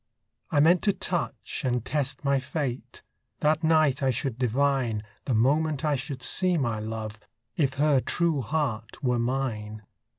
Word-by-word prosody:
I 145 - +2
meant 170 +3 +5
to 200 - +4
touch 175 -3 -3
and 125 -3 0
test 145 -1 -2
my 140 -1 +3
fate; 130 -1 -4 0.4
That 155 +2 +2
night 155 -4 +3
I 135 - +2
should 130 -1 -2
divine, 125 -3 +1 0.2
The 130 - 0
moment 150 +5 +2
I 150 -1 +2
should 135 -1 -5
see 185 -2 +3
my 120 -7 -1
love, 110 0 -5 0.4
If 135 -4 +1
her 145 -1 +3
true 165 +1 0
heart 130 -4 -3
were 125 -2 +1
mine. 115 -4 -2
135 Hz, 155 wpm, -27 LUFS, 120-150 Hz, 0.4 s, meant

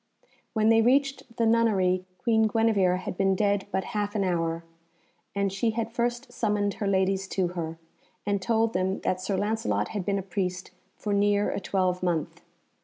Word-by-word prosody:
When 220 -1 +3
they 225 0 +6
reached 270 -1 +1
the 230 - +2
nunnery 195 -5 +2
Queen 220 0 +3
Guenevere 210 -5 +2
had - - -5
been 195 +1 +2
dead 200 0 +1
but 190 - 0
half 205 0 -2
an 200 - +1
hour, 165 -2 -1 0.7
and 200 -1 0
she 210 +4 +1
had 230 -1 -1
first 240 +1 -2
summoned 210 -3 0
her 205 - -3
ladies 195 0 +1
to 185 -2 0
her, 165 -2 -5 0.5
and 200 -1 0
told 225 +2 +1
them 185 +1 0
that 185 0 -1
Sir 190 +1 -1
Lancelot 155 - 0
had 205 - -3
been 200 +1 0
a 195 - -3
priest 180 -1 -3 0.3
for 210 - -2
near 205 0 +2
a - - -2
twelvemonth. 180 -4 -1
200 Hz, 175 wpm, -27 LUFS, 185-220 Hz, 0.7 s, they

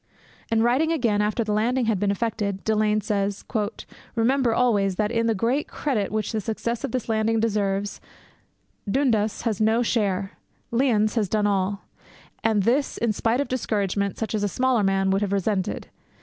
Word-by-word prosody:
And, 225 0 +2
writing 265 +7 +2
again 235 -10 +1
after 215 +2 0
the 215 - -3
landing 240 +4 +1
had 220 -4 +1
been 205 0 +1
effected, 200 -2 -2
Delane 215 -1 +2
says, 200 -1 -2 0.7
'Remember 245 +2 +2
always, 205 -5 +2
that, 210 +2 0
in 230 -1 +1
the 225 - +2
great 240 +8 0
credit 245 -9 -2
which 215 -1 -1
the 220 -2 -1
success 225 +3 -3
of - - -2
this 255 -2 -2
landing 225 0 +1
deserves, 205 -2 -1 0.9
Dundas 220 -4 +1
has 220 -3 -1
no 220 +2 +3
share. 200 -4 0 0.4
Lyons 230 -4 +2
has 215 -6 0
done 210 +1 +1
all, 195 0 0 0.6
and 220 -3 +2
this 260 +7 +1
in 230 -2 +1
spite 230 +5 +1
of 285 - -2
discouragement 200 -5 -1
such 225 - -3
as 215 - 0
a 205 - +1
smaller 250 +3 +1
man 195 -1 +2
would 195 +1 +1
have 205 -2 -1
resented. 200 -1 -1
215 Hz, 175 wpm, -24 LUFS, 200-235 Hz, 0.9 s, no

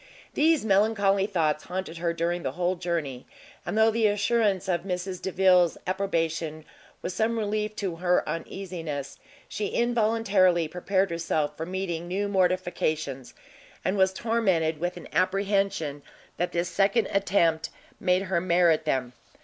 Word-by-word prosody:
These 315 -4 +3
melancholy 200 -1 +3
thoughts 160 -6 0
haunted 180 -2 -5
her 170 0 0
during 170 +1 -1
the 135 -4 -3
whole 180 +2 0
journey, 165 -8 -3 0.4
and - - -2
though 220 0 +5
the 225 -1 +2
assurance 205 -2 +1
of 175 -3 +1
Mrs 180 0 -4
Delvile's 185 -2 +3
approbation 165 -4 -2 0.4
was 180 - -3
some 225 +4 0
relief 215 0 -2
to 185 -6 -3
her 180 +1 +1
uneasiness, 165 -4 -5 0.3
she 205 0 -3
involuntarily 215 -8 +2
prepared 185 +3 0
herself 165 -3 -1
for 160 - -5
meeting 180 -2 -3
new 195 +3 -1
mortifications, 175 -8 -1 0.5
and 185 - +1
was 190 -1 +3
tormented 190 -8 0
with 175 +2 -2
an - - -9
apprehension 195 -6 0 0.4
that 175 - -1
this 175 +1 -1
second 200 +4 +2
attempt 170 -6 +2 0.3
made 180 0 +2
her 185 -3 0
merit 170 -3 +3
them. 130 -4 -1
180 Hz, 140 wpm, -26 LUFS, 165-200 Hz, 0.5 s, though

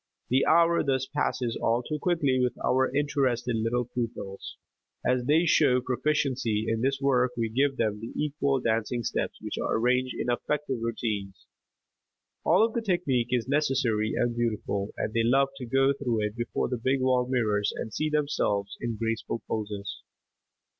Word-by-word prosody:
The 130 +2 +3
hour 170 +1 +5
thus 130 -1 0
passes 130 -5 -1
all 115 +2 +1
too 150 +4 -4
quickly 150 -8 +2
with 125 -1 0
our 130 +1 +2
interested 130 -4 0
little 115 +2 0
pupils. 115 -5 -5 0.5
As 125 -1 +1
they 155 +5 +4
show 140 -6 +4
proficiency 125 -4 0
in 115 0 0
this 135 +2 +1
work 130 -2 +2
we 115 -1 0
give 135 +4 +1
them 105 -2 0
the 115 +2 -7
actual 140 -2 0
dancing 115 +1 -1
steps - - -2
which - - -5
are - - 0
arranged 125 +2 +1
in 120 - -1
effective 135 +1 -2
routines. 105 -4 -3 1.0
All 220 - +5
of 225 - -4
the 235 - -1
technique 175 - 0
is 125 -2 0
necessary 130 -7 +1
and 120 -1 0
beautiful 105 -4 -2
and 110 - -2
they 115 - +2
love 135 +4 +3
to 125 -3 -6
go 135 +3 +3
through 120 -6 -1
it 105 0 -2
before 120 -1 -2
the 120 -2 -4
big 135 +1 +2
wall 130 -1 +2
mirrors 105 -5 +1
and 110 - -5
see 155 - -1
themselves 140 -10 0
in 115 -2 -3
graceful 115 0 -3
poses. 105 -2 -4
125 Hz, 165 wpm, -27 LUFS, 115-135 Hz, 1.0 s, hour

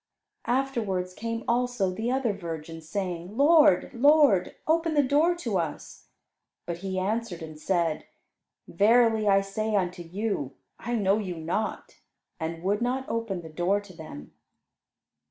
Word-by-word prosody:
Afterwards, 230 -8 -1
came 230 +3 -4
also 240 -5 +1
the 220 +6 -3
other 260 -4 +1
virgins, 165 -3 -7
saying, 185 +1 -4
"Lord, 290 - +5
Lord, 275 - +4
open 325 0 +1
the 290 - +5
door 300 +6 +3
to 230 - -2
us." 165 -3 -6 0.6
But 170 -1 -4
he 190 0 -4
answered 195 -2 -2
and 155 -1 -9
said, 170 -2 0 0.6
"Verily 220 +3 +3
I 195 -1 +5
say 215 +2 -2
unto 180 -2 -1
you, 175 - -3 0.2
I 240 +1 -3
know 200 -1 +2
you 185 -4 -4
not," 170 +7 -3 0.4
and 165 +1 -4
would 205 +4 0
not 255 +2 -1
open 225 -6 -2
the 160 - -9
door 180 +5 +1
to 205 -2 -13
them. 155 - -10
200 Hz, 140 wpm, -27 LUFS, 175-235 Hz, 0.6 s, Lord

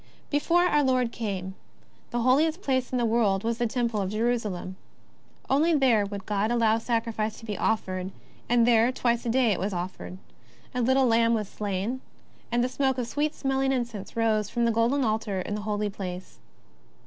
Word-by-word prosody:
Before 335 +4 +3
our 295 -5 +3
Lord 255 -3 +2
came, 190 -5 -4 0.6
the 240 - -1
holiest 310 - +2
place 260 -2 0
in 255 - 0
the 240 - +1
world 220 -4 +2
was 230 +1 -1
the 240 - +1
Temple 230 -2 -1
of 190 - -2
Jerusalem. 215 -4 -2 0.7
Only 315 +5 +3
there 240 -8 +3
would 200 -1 -7
God 210 +1 0
allow 230 -2 +2
sacrifice 225 -2 -2
to 225 - -11
be 210 -2 -4
offered, 185 -4 -1 0.4
and 240 -1 +4
there 235 0 +4
twice 240 -2 0
a - - +1
day 245 -1 +3
it 195 - 0
was 195 +2 -2
offered 180 +1 -5 0.3
— 120 +1 -28
a 250 - -1
little 260 +2 +3
lamb 230 -1 +3
was 210 -3 -2
slain, 205 +5 -3 0.5
and 240 0 +2
the - - +2
smoke 265 0 0
of 250 - -1
sweet 295 +5 -1
smelling 270 0 0
incense 235 -6 -3
rose 215 -2 +1
from 235 +2 0
the 230 - +3
golden 235 +5 +2
altar 215 -3 -1
in 185 - -4
the 210 - -3
Holy 210 0 0
Place. 185 -2 -7
230 Hz, 190 wpm, -27 LUFS, 210-255 Hz, 0.7 s, and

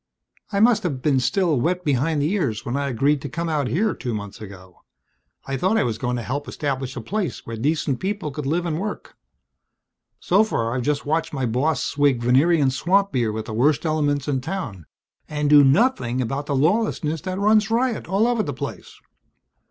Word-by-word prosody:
"I 200 - 0
must 230 +1 +4
have 140 -8 -3
been 140 -4 +3
still 155 +1 +1
wet 180 +4 -1
behind 145 +2 +1
the 155 - 0
ears 140 - -1
when 120 - -2
I 140 0 -1
agreed 140 +3 +1
to 145 - -5
come 170 +5 -3
out 150 -5 0
here 210 - +1
two 120 -3 -4
months 100 -1 -7
ago. 95 -3 -12 0.6
I 135 0 -3
thought 190 - +1
I 220 - +3
was 110 -2 -2
going 125 -1 -1
to 120 - -4
help 140 +7 -4
establish 135 -3 -3
a 125 - -5
place 185 - -3
where 115 - -5
decent 140 +2 -1
people 195 -5 -3
could 145 -1 -5
live 170 +4 0
and 160 -2 -2
work. 210 +2 -6 1.0
So 195 +4 +3
far 115 - -1
I've 125 - -1
just 145 +3 -1
watched 160 +2 -1
my 135 -3 -1
boss 130 +7 0
swig 140 -4 +1
Venerian 140 +3 +3
swamp 195 +9 +1
beer 120 -4 0
with 110 0 -4
the 110 - -6
worst 145 +8 +2
elements 145 -3 0
in 135 -3 0
town, 130 - -5 0.4
and 150 -1 -1
do 145 -1 +8
nothing 135 - +2
about 135 +4 -2
the 140 - 0
lawlessness 160 0 +1
that 185 0 -4
runs 210 +1 +3
riot 235 +1 0
all 195 +5 +2
over 240 -2 +1
the 145 -8 -3
place." 130 - -7
145 Hz, 200 wpm, -22 LUFS, 130-180 Hz, 1.0 s, do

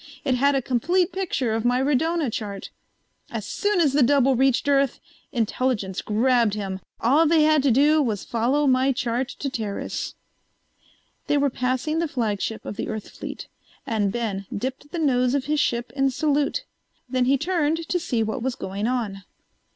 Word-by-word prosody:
It 265 - +2
had 280 +3 +3
a 270 - 0
complete 345 - +1
picture 340 -11 -1
of 225 0 -1
my 245 +1 +2
radona 295 +1 +1
chart. 205 -3 -5 0.6
As - - -5
soon 410 -2 0
as 295 -5 +3
the 290 - +3
double 270 0 +4
reached 265 +1 +2
Earth, 275 -2 +2 0.3
Intelligence 225 -4 -1
grabbed 230 0 +2
him. 195 -2 -4 0.2
All 290 +8 +4
they 315 0 +4
had 310 -1 +4
to 275 - +2
do 295 +5 +4
was 220 -7 -1
follow 250 +6 +1
my 260 0 +3
chart 245 +1 -1
to 285 - -3
Teris." 220 -6 -4 1.1
They 290 - +2
were 280 -1 +2
passing 255 +6 -1
the 335 - 0
flagship 225 -5 -2
of 205 - -6
the - - -3
Earth 220 -1 -5
fleet, - - -8 0.4
and 210 -3 0
Ben 205 -4 -3
dipped 260 +6 -4
the - - -4
nose 255 -4 +2
of 275 - -1
his 300 +1 0
ship 235 -3 0
in 270 -1 +2
salute. 295 - 0 0.4
Then 255 0 +1
he 275 +2 +3
turned 325 0 0
to 355 - 0
see 240 -9 -1
what 220 +3 -3
was 255 +1 -1
going 200 -2 -3
on. 225 -6 -2
260 Hz, 175 wpm, -24 LUFS, 230-290 Hz, 1.1 s, double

